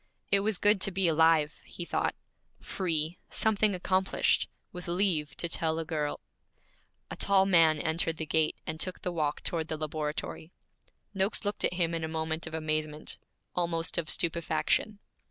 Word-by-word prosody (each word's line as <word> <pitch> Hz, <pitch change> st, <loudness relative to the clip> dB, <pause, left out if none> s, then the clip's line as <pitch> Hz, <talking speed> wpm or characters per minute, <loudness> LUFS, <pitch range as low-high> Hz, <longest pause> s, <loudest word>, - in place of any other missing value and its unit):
It 200 Hz, -, +5 dB
was 205 Hz, 0 st, +1 dB
good 205 Hz, 0 st, +4 dB
to -, -, +2 dB
be 190 Hz, 0 st, +1 dB
alive, 160 Hz, -1 st, +3 dB
he 175 Hz, -, -8 dB
thought, -, -, -1 dB, 0.4 s
free, 165 Hz, -3 st, -2 dB
something 215 Hz, -2 st, +2 dB
accomplished, 185 Hz, +1 st, +1 dB, 0.2 s
with 180 Hz, -1 st, -8 dB
leave 170 Hz, -4 st, 0 dB
to 170 Hz, -, 0 dB
tell 160 Hz, -1 st, +1 dB
a 165 Hz, -, -3 dB
girl 150 Hz, -2 st, -2 dB, 0.9 s
A -, -, -4 dB
tall 195 Hz, -1 st, +3 dB
man 165 Hz, -5 st, +5 dB
entered 160 Hz, +1 st, 0 dB
the 160 Hz, -, -3 dB
gate 155 Hz, 0 st, +1 dB
and 160 Hz, 0 st, -4 dB
took 185 Hz, +2 st, -1 dB
the 180 Hz, -, -1 dB
walk 150 Hz, -3 st, -1 dB
toward 160 Hz, -2 st, -1 dB
the 160 Hz, -, -2 dB
laboratory. 155 Hz, +1 st, -4 dB, 0.6 s
Noakes 195 Hz, +2 st, 0 dB
looked 205 Hz, 0 st, -1 dB
at -, -, +3 dB
him 170 Hz, -2 st, 0 dB
in 165 Hz, -1 st, -2 dB
a -, -, -1 dB
moment 160 Hz, 0 st, -2 dB
of 160 Hz, -, -5 dB
amazement, 155 Hz, -1 st, -2 dB, 0.3 s
almost 170 Hz, -1 st, +1 dB
of 160 Hz, -, -4 dB
stupefaction. 170 Hz, +5 st, +1 dB
165 Hz, 165 wpm, -29 LUFS, 155-185 Hz, 0.9 s, It